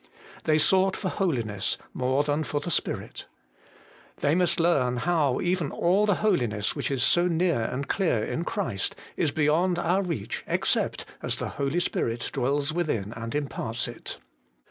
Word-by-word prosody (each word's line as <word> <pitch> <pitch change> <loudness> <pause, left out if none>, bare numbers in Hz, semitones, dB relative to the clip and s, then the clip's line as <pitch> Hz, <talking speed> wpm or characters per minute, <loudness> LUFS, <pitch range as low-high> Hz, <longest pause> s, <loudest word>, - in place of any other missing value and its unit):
They 155 -1 +4
sought 190 +4 +3
for 190 - -2
holiness 115 - -1 0.2
more 130 +3 +1
than 145 +1 0
for 145 - -1
the 160 +4 -4
Spirit. - - -2 0.9
They 145 - +3
must 180 0 +2
learn 135 -8 +2
how 150 -2 +1
even 175 -4 0
all 190 +5 +2
the 205 - +4
holiness 120 - +1
which - - -2
is 135 -3 0
so 175 +1 +4
near 170 -6 +2
and 135 +4 -3
clear 165 - +1
in 165 - -2
Christ, 100 - -2 0.2
is 155 - +1
beyond 160 +5 +2
our 175 +3 +2
reach, 165 - -3
except - - 0 0.2
as - - 0
the - - -3
Holy 140 +5 -1
Spirit 115 -8 -1
dwells 140 +3 0
within 115 - -1
and 115 +2 -5
imparts 125 -6 -2
it. 120 - -6
150 Hz, 160 wpm, -27 LUFS, 125-175 Hz, 0.9 s, They